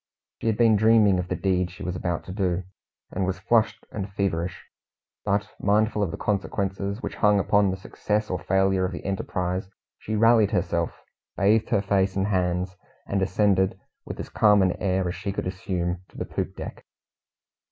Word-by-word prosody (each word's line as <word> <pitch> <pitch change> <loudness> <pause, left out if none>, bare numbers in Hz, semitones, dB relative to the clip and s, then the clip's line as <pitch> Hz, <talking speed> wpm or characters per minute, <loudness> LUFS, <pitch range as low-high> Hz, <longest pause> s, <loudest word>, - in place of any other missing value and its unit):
She - - -2
had 110 -2 +2
been 115 -2 +5
dreaming 110 -3 +5
of 90 - -3
the - - -2
deed 90 -2 0
she 90 - -10
was 90 0 -3
about 90 -2 -2
to - - -8
do, 95 -2 -1 0.5
and 95 - -2
was 95 0 -1
flushed 110 +4 +1
and 100 -2 -5
feverish; 95 -3 -2 0.6
but, 105 0 0
mindful 105 +1 +2
of 100 - +1
the - - -5
consequences 100 0 -2
which - - -5
hung 105 -1 +4
upon 100 0 +3
the 95 - -2
success 105 +3 -2
or 90 - -1
failure 95 +1 +2
of 95 0 -1
the - - -7
enterprise, 95 -1 -2 0.3
she 110 - -3
rallied 115 -1 +5
herself, 85 -4 -1 0.3
bathed 105 +3 +3
her 100 - +2
face 95 -1 +1
and 95 0 +1
hands, 90 -1 0 0.3
and 100 -1 -1
ascended 95 0 +2 0.2
with - - -8
as - - -5
calm 105 -2 +4
an 95 - +3
air 95 -1 +1
as 90 - -2
she 100 +3 -4
could 100 - -3
assume 90 -1 -2
to - - -16
the - - -3
poop - - -4
deck. - - -8
95 Hz, 185 wpm, -25 LUFS, 90-105 Hz, 0.6 s, been